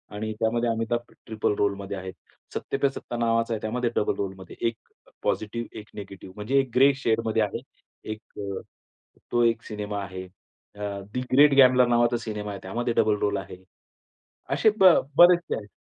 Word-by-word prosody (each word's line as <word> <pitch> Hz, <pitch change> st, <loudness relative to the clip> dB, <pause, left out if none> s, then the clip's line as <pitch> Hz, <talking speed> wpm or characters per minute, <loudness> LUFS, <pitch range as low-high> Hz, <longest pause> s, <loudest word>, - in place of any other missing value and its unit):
आणि 110 Hz, +1 st, -3 dB
त्यामध्ये 115 Hz, +1 st, +1 dB
Amitabh 115 Hz, +1 st, -2 dB, 0.2 s
triple 110 Hz, -2 st, 0 dB
role 100 Hz, -1 st, +2 dB
मध्ये 100 Hz, 0 st, -6 dB
आहे. 95 Hz, 0 st, -6 dB, 0.4 s
सत्ते -, -, -3 dB
पे 140 Hz, 0 st, +2 dB
सत्ता 120 Hz, -3 st, -7 dB
नावाचा 115 Hz, 0 st, +1 dB
आहे 110 Hz, -, -3 dB
त्यामध्ये 120 Hz, +2 st, -1 dB
डबल -, -, +1 dB
रोल 100 Hz, -1 st, -2 dB
मध्ये 95 Hz, -2 st, -11 dB
1 115 Hz, -, -2 dB, 0.5 s
पॉझिटिव्ह, 115 Hz, +2 st, -2 dB
1 105 Hz, -, -13 dB
नेगेटिव्ह 95 Hz, -2 st, -9 dB
म्हणजे 110 Hz, +7 st, +1 dB
एक 135 Hz, -1 st, 0 dB
ग्रे 135 Hz, +2 st, +6 dB
शेड 115 Hz, 0 st, +2 dB
मध्ये 110 Hz, 0 st, +1 dB
आहे. 105 Hz, -, -3 dB, 0.5 s
एक 110 Hz, -, -6 dB, 0.2 s
अ, 100 Hz, -1 st, -4 dB, 0.7 s
तो 120 Hz, 0 st, +3 dB
एक 115 Hz, -1 st, +2 dB
सिनेमा 105 Hz, -1 st, -4 dB
आहे. 95 Hz, -1 st, -7 dB
अ, 100 Hz, +2 st, -9 dB
दि 125 Hz, -, -1 dB
ग्रेट 145 Hz, +2 st, +7 dB
ग्यामलर 125 Hz, -2 st, +6 dB
नावाचा 120 Hz, 0 st, +3 dB
सिनेमा 105 Hz, -3 st, -5 dB
आहे 100 Hz, -, -6 dB
त्यामध्ये 120 Hz, +5 st, -2 dB
डबल 110 Hz, -2 st, +3 dB
रोल 100 Hz, 0 st, +1 dB
आहे. 90 Hz, 0 st, -8 dB, 0.9 s
असे 220 Hz, -, +4 dB
ब 185 Hz, -3 st, +8 dB, 0.2 s
बरेचसे 175 Hz, -1 st, +6 dB
आहेत. 105 Hz, -1 st, -7 dB
110 Hz, 180 wpm, -26 LUFS, 105-120 Hz, 0.9 s, ब